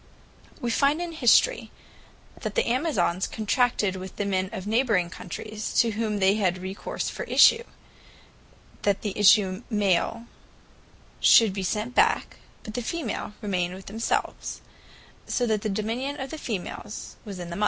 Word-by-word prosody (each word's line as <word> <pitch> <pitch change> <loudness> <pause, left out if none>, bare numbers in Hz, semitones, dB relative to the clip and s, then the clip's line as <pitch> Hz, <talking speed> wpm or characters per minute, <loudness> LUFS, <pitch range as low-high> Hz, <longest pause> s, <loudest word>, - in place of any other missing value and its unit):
We 240 - -2
find 280 +6 +2
in 350 -1 -4
History 325 - +3 0.7
that - - -4
the 470 - +2
Amazons 250 - 0
Contracted 220 -2 +1
with 185 0 -8
the 205 - -2
Men 190 -1 0
of 185 - -5
the 205 - -6
neighbouring 220 -8 +2
Countries, 215 +5 -6
to 230 -2 +4
whom 215 -1 -2
they 190 0 +4
had 185 -4 +1
recourse 190 +2 -5
for - - -5
issue, 460 - +6 1.2
that 200 -1 +1
the 205 -3 -3
issue 200 -1 +4
Male 210 +2 +1 0.9
should 225 -4 +6
be 195 - -3
sent 215 +6 -2
back, - - +2 0.3
but 215 - -8
the 245 - -2
Female 240 -5 -4
remain 180 -3 -1
with 190 - -11
themselves: 225 +3 -2 0.7
so 245 - 0
that 215 -3 0
the 215 - -2
dominion 235 +8 -3
of 265 0 -5
the 315 - -6
Females 210 -2 -6
was 200 -3 -8
in 175 -1 -7
the - - -4
Mother. - - -6
215 Hz, 160 wpm, -26 LUFS, 190-245 Hz, 1.2 s, issue